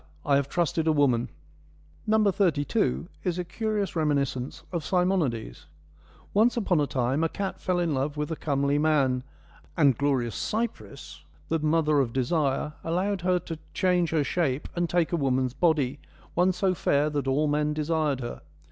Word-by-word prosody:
I 140 - +3
have 140 0 +1
trusted 165 -2 0
a - - +5
woman.' 135 -6 +2 0.8
No. 215 0 +4
32 175 0 0 0.2
is 180 -2 -1
a 180 - -1
curious 210 +1 -2
reminiscence 140 -4 -1
of 170 -4 -2
Simonides: 170 - -1 0.7
Once 225 +4 +3
upon 185 -8 +2
a 145 - +1
time 130 +4 0
a 165 - +1
cat 195 +2 -4
fell 180 -1 0
in 170 -3 0
love 140 +2 -2
with 150 +1 -2
a - - -1
comely 140 -1 0
man, 140 -5 +2 0.6
and 140 -6 +5
glorious 130 -4 0
Cypris, 140 - -4 0.3
the 165 - +1
mother 155 -1 +2
of 120 -4 0
Desire, 140 +2 0
allowed 185 +4 -1
her 180 +1 +2
to 165 -2 -7 0.2
change 180 -3 +2
her 160 -3 +1
shape 145 -3 -1
and 175 -1 0
take 175 -2 +1
a 170 - +1
woman's 130 -3 0
body, 145 -4 +1 0.3
one 180 +2 +3
so 185 +1 +1
fair 150 -3 +1
that 145 -2 -2
all 145 +3 +2
men 150 +1 +1
desired 155 -3 0
her. 120 - -6
155 Hz, 165 wpm, -27 LUFS, 140-175 Hz, 0.8 s, a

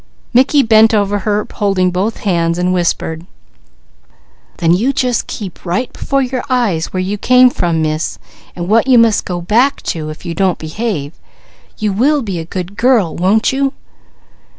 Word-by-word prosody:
Mickey 265 +3 +4
bent 220 0 +5
over 205 0 +1
her 210 +1 -1
holding 190 -3 +1
both 195 +5 -2
hands 170 -4 0
and 180 +1 0
whispered: 170 -1 -2 1.3
"Then 170 0 +3 0.2
just 265 - 0
you 250 -1 0
keep 195 -5 -7
right 185 +8 -2
before 275 -1 -1
your 255 -1 -3
eyes 220 -11 0
where 185 - -2
you 200 +2 -3
came 250 +2 +5
from, 165 -6 -1
Miss, 155 +1 -2 0.4
and 175 -1 -5
what 225 +5 +3
you 255 -2 +5
must 230 -3 +3
go 175 -1 -4
back 240 +10 +2
to, 155 -2 -6
if 155 +4 -10
you 170 - -3
don't 190 -1 0
behave. 160 -3 -4 0.6
You 210 -3 -1
will 275 +7 +2
be 195 -6 -4
a 165 - -6
good 185 +3 -6
girl, 230 -9 +2
won't 205 +8 +2
you?" 275 0 0
200 Hz, 170 wpm, -15 LUFS, 175-235 Hz, 1.3 s, bent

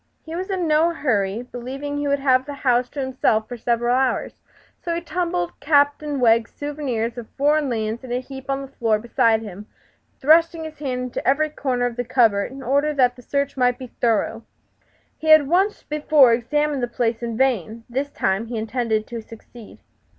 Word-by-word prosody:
He 320 - -9
was 370 +3 -4
in 370 -3 -1
no 310 +2 +4
hurry, 215 -6 0
believing 260 +4 -6
he 290 - -2
would 280 0 +2
have 265 -1 +2
the 290 - -5
house 245 0 +3
to 290 - -7
himself 255 -5 0
for 245 - -6
several 240 +1 0
hours; 260 0 0 0.5
so 340 -1 -2
he 340 - -3
tumbled 340 - -2
Captain 290 -1 +2
Wegg's 230 -1 +3
souvenirs 255 -6 -3
of 230 - -10
foreign 295 0 +2
lands 225 0 -3
in 255 - -8
a 245 - 0
heap 265 +1 -10
on 275 0 -1
the - - -8
floor 225 -2 +2
beside 225 0 +1
him, 205 0 -9 0.5
thrusting 330 +3 +4
his 315 -2 -9
hand 255 -4 -3
into 250 - -5
every 300 +3 +2
corner 255 -4 -1
of 245 -1 -3
the 245 - -1
cupboard 230 -4 +2
in 270 0 -9
order 285 +4 +1
that 250 -2 +3
the 250 - -13
search 280 +2 -2
might 250 -2 +2
be 255 -3 -10
thorough. 225 -1 +1 0.8
He 315 - -6
had 310 -2 +7
once 380 +6 +1
before 295 -4 +4
examined 295 +4 0
the 245 - 0
place 235 -1 -1
in 230 -2 -4
vain; 230 -4 0
this 270 +4 -2
time 195 -3 -1
he 235 0 -4
intended 220 -1 -1
to 235 0 -6
succeed. 225 0 -14
255 Hz, 195 wpm, -22 LUFS, 230-290 Hz, 0.8 s, had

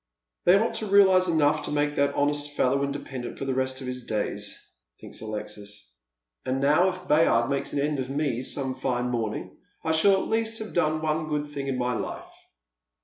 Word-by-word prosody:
" - - -58
They 180 +2 +7
ought 225 +3 +1
to 220 - -3
realise 190 -2 +6
enough 155 -2 +2
to - - -5
make 145 0 +1
that 140 0 +1
honest 145 0 0
fellow 135 +2 +2
independent 140 -3 -5
for - - -4
the 135 - 0
rest 130 +1 -1
of - - -6
his 125 0 -5
days," 105 -2 -3 0.4
thinks - - -7
Alexis; 105 - -7 0.5
"and 130 +1 -1
now 150 +7 +4
if 185 0 -8
Bayard 135 -5 +3
makes 140 0 -1
an - - -1
end 145 0 0
of 130 0 -3
me 140 -4 -1
some 130 0 -3
fine 125 -1 -1
morning, 115 -3 -3 0.2
I 160 - 0
shall 160 +5 +5
at 190 - +1
least 225 0 0
have 220 -1 -7
done 155 -2 +1
one 155 0 -1
good 150 -1 -1
thing 145 -2 -6
in 135 -2 -1
my 125 0 0
life." - - -4
140 Hz, 205 wpm, -26 LUFS, 125-155 Hz, 0.5 s, They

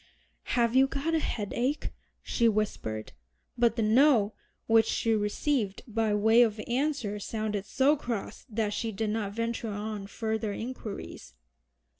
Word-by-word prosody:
"Have 235 0 +3
you 265 +1 +6
got 280 +5 -2
a 325 - +3
headache?" 245 +3 -2 0.3
she 235 -1 +2
whispered; 200 - -2 0.4
but 235 -2 +3
the 230 - 0
"No" 220 -1 +4 0.3
which 225 -1 +4
she 230 - +1
received 210 +1 0
by 225 -1 0
way 220 +3 +5
of 220 -3 +2
answer 250 -5 -1
sounded 210 -1 -3
so 275 +3 +3
cross 240 -8 -5
that 215 -1 -1
she 225 +1 -2
did 215 +1 -2
not 210 -2 -2
venture 230 0 -2
on 205 -1 -4
further 220 0 -2
inquiries. 215 - -7
225 Hz, 140 wpm, -29 LUFS, 210-240 Hz, 0.4 s, you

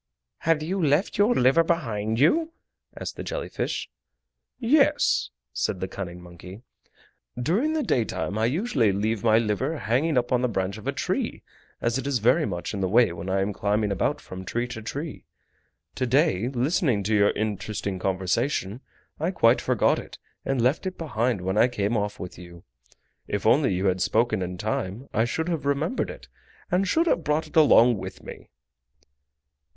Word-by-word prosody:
"Have 160 -2 +1
you 185 +3 -1
left 155 +8 +1
your 215 +4 +4
liver 130 +6 +4
behind 115 -10 -1
you?" 320 - +3 0.5
asked - - -6
the - - -5
jelly - - -4
fish. - - -3 0.7
"Yes," 280 - +3 0.2
said 95 - -1
the 95 - -3
cunning 90 -2 -7
monkey, 90 +4 -12 0.8
"during 205 - +1
the 315 -2 0
daytime 110 - -1
I 110 +1 +1
usually 135 - +1
leave 105 +2 -1
my 110 -1 +5
liver 115 +8 0
hanging 130 +7 0
up 120 0 0
on 125 -1 +3
the 125 - +2
branch 100 -1 -2
of - - -10
a - - +2
tree, - - -2 0.4
as 115 +2 0
it 135 - -5
is 140 -3 +1
very 125 +8 +3
much 85 +4 -4
in 100 - -3
the 95 - 0
way 115 -3 +4
when 85 +2 -6
I 95 +1 +1
am 100 +1 -1
climbing 105 +1 0
about 100 - 0
from 95 0 -9
tree 120 +6 -2
to 125 -3 -6
tree. 145 +7 -6 0.7
To 130 - -2
day, 130 - +2
listening 130 - +1
to 110 +3 -1
your 100 -1 +4
interesting 105 -2 -3
conversation, 95 +5 -1 0.4
I 160 +3 0
quite 120 -10 +3
forgot - - +2
it, - - -10 0.3
and 135 -1 -1
left 140 +9 +1
it 185 - -5
behind 120 - -1
when 95 +3 0
I - - +6
came 115 -2 -1
off 105 -1 -2
with 90 -2 -8
you. 85 -1 -12 0.6
If - - -3
only - - +4
you 95 +2 -1
had 95 -1 +1
spoken 110 +1 +1
in 90 0 -4
time 110 +4 -3
I 110 - +2
should 160 +7 -2
have 165 -4 -2
remembered 140 - -1
it, - - -10 0.4
and 190 +2 +2
should 325 - +2
have 175 - +1
brought 150 +1 0
it 155 - -16
along 125 -7 +6
with - - -8
me!" - - -10
120 Hz, 180 wpm, -25 LUFS, 100-155 Hz, 0.8 s, I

